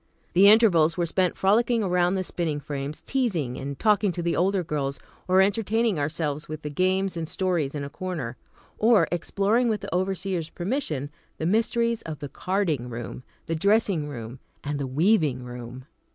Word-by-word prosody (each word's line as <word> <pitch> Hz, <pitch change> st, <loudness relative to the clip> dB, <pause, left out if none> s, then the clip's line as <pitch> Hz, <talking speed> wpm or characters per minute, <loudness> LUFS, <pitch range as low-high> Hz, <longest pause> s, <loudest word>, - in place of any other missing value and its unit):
The 190 Hz, +3 st, +7 dB
intervals 180 Hz, -8 st, +5 dB
were 175 Hz, -, +1 dB
spent 180 Hz, +1 st, 0 dB
frolicking 230 Hz, +4 st, +3 dB
around 190 Hz, -, -1 dB
around 180 Hz, +1 st, +3 dB
the 190 Hz, -, -1 dB
spinning 165 Hz, -5 st, -2 dB
frames, 145 Hz, +1 st, -5 dB
teasing 180 Hz, -, -1 dB
and 140 Hz, +1 st, -5 dB
talking 210 Hz, 0 st, +3 dB
to 175 Hz, -, -4 dB
the 170 Hz, -, 0 dB
older 190 Hz, +1 st, +1 dB
girls, 140 Hz, -3 st, -2 dB, 0.3 s
or 185 Hz, +1 st, +5 dB
entertaining 215 Hz, -1 st, +1 dB
ourselves 150 Hz, 0 st, -2 dB
with 155 Hz, 0 st, -6 dB
the 150 Hz, -, -4 dB
games 185 Hz, +3 st, +1 dB
and 165 Hz, -2 st, -4 dB
stories 170 Hz, -7 st, -1 dB
in 145 Hz, -, -3 dB
a 140 Hz, -, -5 dB
corner, 160 Hz, -11 st, -4 dB, 0.4 s
or 225 Hz, -1 st, +5 dB
exploring 200 Hz, +7 st, +1 dB
with 215 Hz, -2 st, 0 dB
the -, -, -6 dB
overseer's 185 Hz, -2 st, -1 dB
permission, 175 Hz, -, -3 dB, 0.3 s
the 160 Hz, -, -3 dB
mysteries 230 Hz, +4 st, +1 dB
of 160 Hz, -2 st, -6 dB
the 145 Hz, -, -7 dB
the 140 Hz, -, -10 dB
carding 170 Hz, -10 st, -1 dB
room, 120 Hz, +1 st, -6 dB, 0.2 s
the 165 Hz, -, -2 dB
dressing 195 Hz, -2 st, +2 dB
room 120 Hz, -2 st, -7 dB, 0.2 s
and 145 Hz, 0 st, -3 dB
the 140 Hz, -, -2 dB
weaving 150 Hz, -, +2 dB
room. 125 Hz, +1 st, -8 dB
175 Hz, 180 wpm, -25 LUFS, 145-200 Hz, 0.4 s, The